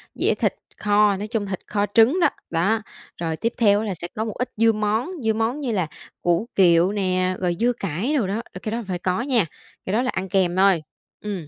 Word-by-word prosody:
dĩa - - +2
thịt - - 0 0.2
kho, 210 -1 +3
nói 210 +2 -4
chung, 220 -2 -2
thịt 190 -2 -4
kho 205 -1 0
trứng 245 +11 +5
đó, - - +5 0.2
đó. 195 +7 +1 0.4
Rồi 165 -2 -2
tiếp 230 +1 -1
theo 205 -4 +4
á 220 - -2
là 200 - -2
sẽ 170 - -6
có 220 - -1
một 220 - -4
ít 250 - -2
dưa 225 +1 +5
món, 215 - -1
dưa 220 - +2
món 225 +6 -1
như 260 -5 -2
là 185 -7 0 0.3
củ 175 +6 +1
kiệu 175 0 +5
nè, 185 -2 0
rồi 175 -2 0
dưa 245 +1 +3
cải 200 - -2
đồ 210 -7 +1
đó, 210 +4 -2
ờ, 185 - -7
cái 215 - -3
đó 230 +1 -2
phải 180 -2 -3
có 185 +4 0
nha, 240 -7 +2 0.4
cái 185 - -2
đó 225 - +3
là 255 - -1
ăn 190 0 -3
kèm 180 -1 +2
thôi, 190 -4 +4 0.4
ừm. 195 -7 -5
205 Hz, 240 wpm, -23 LUFS, 185-225 Hz, 0.4 s, trứng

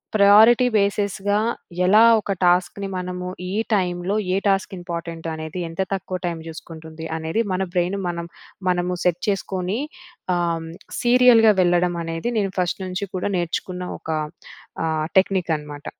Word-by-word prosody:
Priority 215 +4 +7
బేసెస్‌గా 200 0 0 0.5
ఎలా 210 +4 +6 0.2
ఒక 200 - -4
టాస్క్‌ని 180 +3 +2
మనము 180 0 -4 0.2
ఈ - - -3 0.2
టైమ్‌లో 180 +1 -1 0.2
ఏ - - +2
టాస్క్ 195 0 +1
ఇంపార్టెంట్ 170 -1 -6
అనేది 160 +3 -6
ఎంత 165 +3 -3
తక్కువ 185 -1 -3
టైమ్ 170 -2 -3
చూసుకుంటుంది 160 0 -9
అనేది 160 +8 -1
మన 190 +1 0
బ్రెయిన్‌ 180 +3 +1
మనం 170 -1 -4 0.4
మనము 180 0 0
సెట్ 175 -1 +1
చేసుకొని 195 +2 -2 0.5
ఆహ్, 170 -2 -1 0.3
సీరియల్‌గా 240 -3 +6
వెళ్ళడం 175 0 +2
అనేది 165 +7 -3
నేను 195 -2 0
ఫస్ట్ 180 +1 -1
నుంచి 185 +2 -3
కూడా 185 +2 -1
నేర్చుకున్న 180 +1 -3
ఒక - - -12 0.8
ఆహ్, 155 -1 0
టెక్నిక్ 190 -3 +2
అనమాట. 145 -1 -10
180 Hz, 135 wpm, -22 LUFS, 170-200 Hz, 0.8 s, Priority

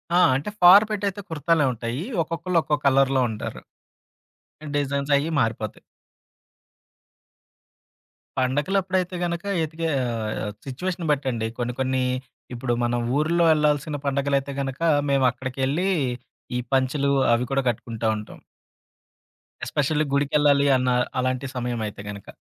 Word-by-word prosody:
ఆ! - - +6 0.2
అంటే 145 +10 -2
ఫార్ 190 +4 +9
పెట్ 210 -1 -2
అయితే 200 +1 -4
కుర్తాలే 160 -1 +2
ఉంటాయి. 120 +5 -4 0.2
ఒక్కొక్కళ్ళు 165 +2 0
ఒక్కొ 150 - +1
కలర్‌లో 135 -1 +4
ఉంటారు. 110 -1 -6 1.2
డిజైన్స్ 140 0 -1
అయి 145 +3 0
మారిపోతాయి. 110 -2 -2 2.6
పండగలప్పుడైతే 180 +8 0
గనక 170 0 -3 0.2
ఎతికే 160 +1 -3 0.2
ఆహ్, 110 -3 -3
సిట్యుయేషన్ 170 +6 -4
బట్టండి. 130 -6 -1
కొన్ని, 120 0 -2
కొన్ని 130 0 +1 0.5
ఇప్పుడు 120 0 -1
మనం 120 0 0 0.2
ఊర్లో 170 +3 +2
ఎళ్ళాల్సిన 150 0 +1
పండగలైతే 140 0 0
గనుక 135 +2 -5 0.3
మేమక్కడికెళ్ళి, 135 +5 0 0.7
ఈ - - 0
పంచలు 135 +2 +2 0.2
అవి 120 +2 +1
కూడా 135 - +2
కట్టుకుంటా 115 -1 -3
ఉంటాం. 105 - -9 1.3
ఎస్పెషల్లీ 150 +1 0
గుడికెళ్ళాలి 140 0 +3
అన్న 125 0 0 0.3
అలాంటి 130 +1 -1
సమయం 120 -1 -2
అయితే 100 - -8
గనక. 100 -1 -8
140 Hz, 110 wpm, -24 LUFS, 125-155 Hz, 2.6 s, ఫార్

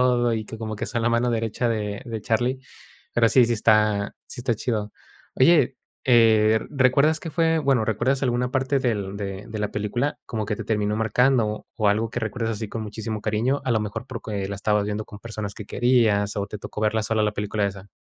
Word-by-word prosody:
todo, 120 -1 +3
y 110 - -3
que 110 - -8
como 110 -1 -5
que - - -4
son 120 -3 -2
la 115 - +2
mano 120 +1 +2
derecha 115 +1 -1
de 105 -3 -2
de 115 -3 -5
Charlie. 120 +4 0 0.5
Pero 115 -1 +4
sí, 125 +1 +5
sí 120 - 0
está 105 -2 +2
sí 125 - -7
está 120 -1 0
chido. 110 -2 -2 0.4
Oye, 140 -1 +4 0.3
eh, 110 -3 +5
¿recuerdas 140 +3 +3
qué 165 - -6
fue, 165 0 +2
bueno, 135 -6 +2
recuerdas 120 +6 0
alguna 125 0 0
parte 135 +1 +1
del 105 -6 -1
de 100 -1 -5
de 110 - -6
la 105 0 -1
película 120 +7 -2
como 110 -2 -3
que 105 -1 -2
te - - -6
terminó 105 -1 0
marcando, 110 0 +1
o 110 -3 +2
algo 110 +2 +1
que 120 - -3
recuerdas 115 0 -2
así 110 0 -5
con 110 +2 -5
muchísimo 110 0 -5
cariño? 115 +7 0
A 130 - -1
lo 115 - +3
mejor 110 +4 -5
porque 105 -5 -4
la 100 - -4
estabas 105 0 +1
viendo 105 +1 -3
con 105 - -11
personas 110 -3 -6
que 105 - -8
querías, 110 -5 +2
o 100 -1 -1
te 105 +1 -7
tocó 105 - -7
verla 110 +1 +1
sola 110 0 +1
la 105 0 +1
película 105 0 -1
esa. 100 0 -7
110 Hz, 215 wpm, -24 LUFS, 105-125 Hz, 0.5 s, sí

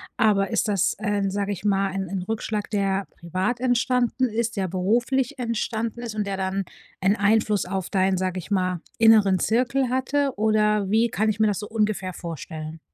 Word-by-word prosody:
aber 200 -2 +2
ist 225 - +1
das, 195 -2 +1
ähm, 205 -2 0
sage 200 0 -1
ich 200 - -9
mal, 195 -1 +2
ein 190 0 -3
ein 190 -1 -3
Rückschlag, 215 +1 -3
der 195 -1 0
privat 185 +8 -2
entstanden 250 0 +1
ist, 230 -1 -2
der 190 -1 0
beruflich 240 +9 0
entstanden 230 0 -2
ist 235 -3 -5
und 210 -1 -2
der 195 -1 -2
dann 190 0 -2 0.4
'n 195 +2 +3
Einfluss 210 -2 +2
auf 190 0 -3
deinen, 190 -1 +2
sage 185 0 -2
ich 185 +3 -7
mal, 185 -3 0 0.2
inneren 215 -4 +6
Zirkel 250 +5 +1
hatte, 270 +2 0
oder 210 -2 +2
wie 230 +2 +3
kann 215 +1 0
ich 215 - -2
mir 220 - +4
das 205 -2 0
so 210 - -6
ungefähr 210 -4 -1
vorstellen? 160 -1 -7
210 Hz, 185 wpm, -24 LUFS, 190-225 Hz, 0.4 s, inneren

